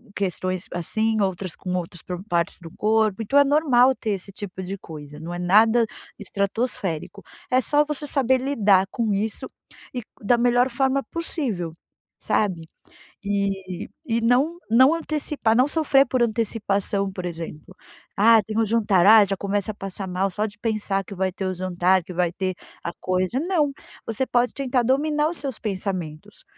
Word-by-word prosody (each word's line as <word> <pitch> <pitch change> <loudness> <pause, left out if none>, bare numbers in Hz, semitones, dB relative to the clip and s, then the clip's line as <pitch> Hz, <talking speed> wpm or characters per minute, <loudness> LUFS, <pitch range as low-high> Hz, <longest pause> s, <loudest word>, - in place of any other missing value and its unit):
questões 185 -2 -2
assim, 220 +6 0
outras 190 -2 -2
com 180 -1 -5
outros 175 -2 -4
pro 180 +1 -6
partes 170 -1 0
do 165 - -9
corpo. 215 -1 +2
Então 275 +7 +1
é 285 - +8
normal 270 -3 +4
ter 220 -4 -3
esse 195 0 -4
tipo 190 -1 -7
de 190 +2 -5
coisa, 150 -4 -10
não 165 +2 -6
é 175 - -5
nada 220 +6 +4 0.3
estratosférico. 200 -3 -2 0.3
É 255 - +5
só 295 +4 +3
você 295 0 -4
saber 260 -2 +2
lidar 205 -8 +3
com 225 -3 0
isso 210 +2 -2 0.5
e 250 - -2 0.2
da 235 +4 +3
melhor 245 +1 +3
forma 265 +2 +1
possível, 250 - -3 0.5
sabe. 190 -6 0 0.6
E 195 -2 -2 0.2
e 230 -1 0
não 270 +9 +2
não 260 +7 +6
antecipar, 300 -7 -1
não 255 +3 +4
sofrer 290 -3 +3
por 250 -1 +1
antecipação, 205 -3 -1
por 185 -1 -6
exemplo: 165 -3 -7 0.4
"Ah, 220 +1 +6
tem 215 +2 -4
o 225 - +4
jantar". 205 -5 +3
Ah, 215 -1 +9
já 195 0 -2
começa 200 +1 -2
a - - -18
passar 195 -1 -6
mal 185 +2 0
só 210 +3 -2
de 205 -1 -11
pensar 205 -3 -1
que 200 - -9
vai 190 0 0
ter 190 +1 -4
o 185 - -1
jantar, 185 +1 +1
que 180 - -8
vai 175 -1 +1
ter 185 0 -2 0.3
a 170 - -3
coisa, 185 +6 0
não. 325 -3 +1 0.4
Você 225 +4 -1
pode 245 0 +1
tentar 260 -2 0
dominar 295 +4 +2
os 345 - -6
seus 270 -5 -4
pensamentos. 190 -2 -5
205 Hz, 170 wpm, -23 LUFS, 185-245 Hz, 0.6 s, Ah